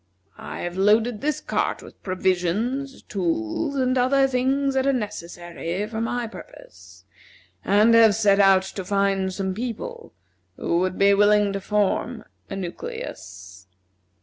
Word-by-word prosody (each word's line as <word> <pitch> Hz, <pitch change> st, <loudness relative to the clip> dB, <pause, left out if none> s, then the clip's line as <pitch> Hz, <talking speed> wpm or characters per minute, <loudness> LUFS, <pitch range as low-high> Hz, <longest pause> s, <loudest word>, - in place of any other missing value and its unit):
I -, -, -7 dB
have 175 Hz, +1 st, -5 dB
loaded 215 Hz, +3 st, +2 dB
this 300 Hz, -1 st, -1 dB
cart -, -, -2 dB
with -, -, -15 dB
provisions, 190 Hz, +9 st, -1 dB
tools, 180 Hz, -, -2 dB
and 255 Hz, -1 st, +1 dB
other 270 Hz, +2 st, +3 dB
things 270 Hz, +2 st, 0 dB
that 265 Hz, 0 st, +1 dB
are -, -, +4 dB
necessary 175 Hz, -4 st, -4 dB
for 220 Hz, +1 st, -5 dB
my 240 Hz, +1 st, -2 dB
purpose, -, -, -13 dB, 0.6 s
and 210 Hz, +3 st, +4 dB
have 225 Hz, -3 st, +6 dB
set 205 Hz, -2 st, +3 dB
out 195 Hz, -1 st, +5 dB
to 190 Hz, 0 st, -6 dB
find 195 Hz, 0 st, 0 dB
some 190 Hz, 0 st, -3 dB
people 355 Hz, -, -6 dB, 0.4 s
who 170 Hz, -, 0 dB
would 185 Hz, 0 st, -1 dB
be 200 Hz, 0 st, +5 dB
willing 205 Hz, 0 st, +4 dB
to 195 Hz, -, -3 dB
form 210 Hz, +4 st, -1 dB, 0.3 s
a -, -, -5 dB
nucleus. 95 Hz, -, -8 dB
205 Hz, 140 wpm, -23 LUFS, 185-245 Hz, 0.6 s, have